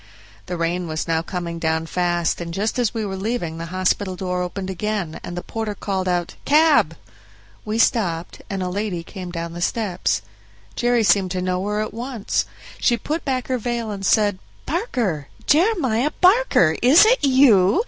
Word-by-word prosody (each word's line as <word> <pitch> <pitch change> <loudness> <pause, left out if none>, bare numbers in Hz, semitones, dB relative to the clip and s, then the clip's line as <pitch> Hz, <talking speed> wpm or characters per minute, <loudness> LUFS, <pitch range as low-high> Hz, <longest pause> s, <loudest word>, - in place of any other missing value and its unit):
The 180 -1 -3
rain 170 +1 -1
was 155 0 -3
now 165 -1 +1
coming 170 0 -5
down 160 0 0
fast, 175 0 0
and 170 0 -5
just 215 +5 -1
as 235 -3 +1
we 225 -2 -3
were 190 -1 -4
leaving 190 -5 -3
the 165 - -5
hospital 185 +1 0
the 185 - -14
door 180 0 -1
opened 185 +2 -4
again, 195 -4 -3
and 175 - -6
the 175 - -4
porter 220 -2 -4
called 190 -2 -2
out, 175 -1 -1
"Cab!" 295 - +4 0.7
We 215 +1 -2
stopped, 180 -8 0
and 195 -2 -2
a 180 - -2
lady 190 -3 -3
came 180 +1 -8
down 170 -1 -5
the 175 - -7
steps. 185 - -1 0.5
Jerry 240 -1 +2
seemed 200 -2 +3
to 185 0 -2
know 185 0 -1
her 210 +1 -1
at 215 - -4
once; 240 -2 -2 0.3
she 240 - +2
put 310 +7 -3
back 260 -3 -2
her 255 -1 -1
veil 235 -1 -2
and 195 -1 -6
said, 205 -1 +2 0.3
"Barker! 240 - -2 0.2
Jeremiah 300 - +2
Barker, 370 - +4
is 280 - +7
it 470 -5 +3
you? 260 - +5
195 Hz, 180 wpm, -21 LUFS, 175-240 Hz, 0.7 s, is